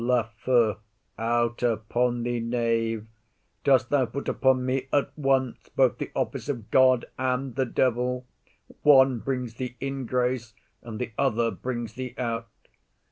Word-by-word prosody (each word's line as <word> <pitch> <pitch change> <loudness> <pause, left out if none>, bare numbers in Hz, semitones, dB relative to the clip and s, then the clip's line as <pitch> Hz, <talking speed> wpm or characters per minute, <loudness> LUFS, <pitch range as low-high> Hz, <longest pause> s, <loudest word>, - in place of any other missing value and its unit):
LAFEW. 115 -2 +2 0.4
Out 120 +1 0
upon 120 +1 0
thee, 120 0 -1
knave! 115 -2 0 0.6
dost 130 -3 +3
thou 145 -2 +4
put 140 +6 -6
upon 130 -1 +2
me 130 0 -1
at 145 - +1
once 135 -4 0
both 130 -3 +3
the - - -4
office - - -2
of 115 -5 -4
God 130 -2 +5
and 130 0 -1
the 130 +1 0
devil? 125 +1 0 0.6
One 135 -4 +6
brings 125 0 -3
thee 125 +1 -6
in 135 -2 -4
grace, 125 -3 -1 0.3
and 115 -2 -7
the 125 0 -4
other 120 -4 +2
brings 120 -3 -4
thee 125 0 -6
out. 115 -2 -2
125 Hz, 140 wpm, -26 LUFS, 115-130 Hz, 0.6 s, One